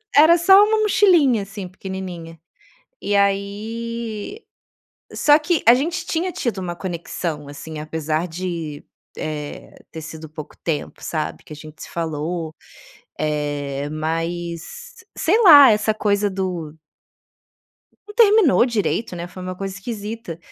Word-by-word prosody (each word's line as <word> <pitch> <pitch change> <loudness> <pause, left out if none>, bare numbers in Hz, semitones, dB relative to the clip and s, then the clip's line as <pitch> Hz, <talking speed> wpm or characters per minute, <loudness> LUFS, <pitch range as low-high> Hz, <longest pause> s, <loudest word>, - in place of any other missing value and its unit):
S - - +8
era 340 +2 +6
só 385 +4 +7
uma 435 0 +1
mochilinha, 350 - +4
assim, 195 -1 -7
pequenininha. 180 -3 -7 0.6
E 205 - 0
aí 215 - -2 0.7
só 295 0 +5
que 325 +1 0
a 235 - +10
gente 325 +5 -2
tinha 355 +3 -1
tido 235 - -3
uma 175 -2 -4
conexão, 170 -4 -5
assim, 155 +2 -8
apesar 155 +2 -2
de, 165 -3 -5 0.3
eh, 150 -1 -6 0.2
ter 160 - -7
sido 155 0 -9
pouco 155 -1 -9
tempo, 155 -3 -3
sabe, 155 -2 -3
que 155 - -11
a - - -8
gente 155 +1 -11
se - - -10
falou. 160 0 -3 0.7
Eh, 145 -2 -2
mas, 170 - -4 0.2
sei 410 +8 +2
lá, 290 -7 +10
essa 215 +1 +1
coisa 205 -1 +1
do 180 -5 -4 1.3
não 415 - -11
terminou 425 - +5
direito, 220 -4 -1
né? 170 +1 -5
Foi 185 +1 -10
uma 185 0 -5
coisa 195 -1 -5
esquisita. 210 -3 -6
190 Hz, 135 wpm, -21 LUFS, 160-235 Hz, 1.3 s, a